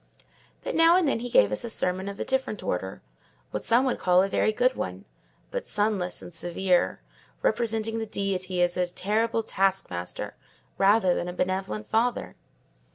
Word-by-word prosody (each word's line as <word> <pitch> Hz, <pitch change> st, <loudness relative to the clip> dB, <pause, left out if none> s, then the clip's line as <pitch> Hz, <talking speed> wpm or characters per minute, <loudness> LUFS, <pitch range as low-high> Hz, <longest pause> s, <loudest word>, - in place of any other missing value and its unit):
But -, -, -3 dB
now 330 Hz, +1 st, +6 dB
and 365 Hz, -4 st, +2 dB
then 275 Hz, -, +1 dB
he 245 Hz, +1 st, -5 dB
gave 100 Hz, -, +5 dB
us 105 Hz, -, -1 dB
a 235 Hz, -, -4 dB
sermon 185 Hz, -2 st, -1 dB
of 200 Hz, -, -8 dB
a -, -, -2 dB
different 265 Hz, -6 st, -1 dB
order—what 65 Hz, -3 st, -6 dB
some 240 Hz, +3 st, +3 dB
would 255 Hz, -, 0 dB
call 180 Hz, 0 st, +4 dB
a -, -, +1 dB
very 195 Hz, -, +1 dB
good 250 Hz, +4 st, +2 dB
one; 90 Hz, +1 st, -5 dB, 0.5 s
but -, -, -3 dB
sunless 205 Hz, -4 st, -1 dB
and 175 Hz, -, -10 dB
severe: 175 Hz, +2 st, 0 dB, 0.4 s
representing 225 Hz, -, 0 dB
the 220 Hz, -, -4 dB
Deity 190 Hz, -3 st, -1 dB
as 175 Hz, 0 st, +1 dB
a 180 Hz, -1 st, +1 dB
terrible 220 Hz, +5 st, 0 dB
taskmaster 190 Hz, -, -1 dB, 0.5 s
rather 195 Hz, -2 st, +4 dB
than 175 Hz, -, -2 dB
a 180 Hz, -, -4 dB
benevolent 180 Hz, -, -2 dB
father. 235 Hz, +2 st, 0 dB
195 Hz, 165 wpm, -26 LUFS, 175-225 Hz, 0.5 s, now